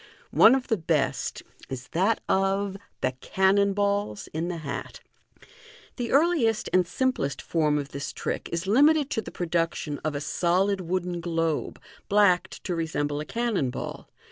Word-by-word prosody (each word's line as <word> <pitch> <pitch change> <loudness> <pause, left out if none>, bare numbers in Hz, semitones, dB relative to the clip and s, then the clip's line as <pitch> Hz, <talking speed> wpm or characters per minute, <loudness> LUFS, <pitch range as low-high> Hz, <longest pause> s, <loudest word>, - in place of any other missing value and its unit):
One 225 +4 +7
of 265 -1 -2
the 225 - +1
best 160 -3 -1 0.3
is 125 -1 -6
that 190 +7 +1
of 195 +1 +1 0.3
Thb 130 0 -1
Cannon 195 +1 +3
balls 200 - -1
in 160 +2 -2
the 175 -1 -3
Hat. 150 -4 -6 0.5
— - - -22
The 240 -2 -3
earliest 275 -8 +3
and 185 -1 +4
simplest 180 - -1
form 155 -3 +1
of 140 -1 -3
this 140 0 -5
trick - - -4
is 170 +2 -2
limited 290 +7 +4
to 220 - 0
the - - -8
production 165 -4 -2
of 155 -1 -3
a - - -1
solid 185 +6 +1
wooden 180 0 -2
globe, 165 -2 -1 0.3
blacked 190 -3 +3
to 185 - -2
resemble 145 -3 -1
a 150 - -4
cannon 230 - -1
ball. - - -6
180 Hz, 160 wpm, -26 LUFS, 160-210 Hz, 0.5 s, One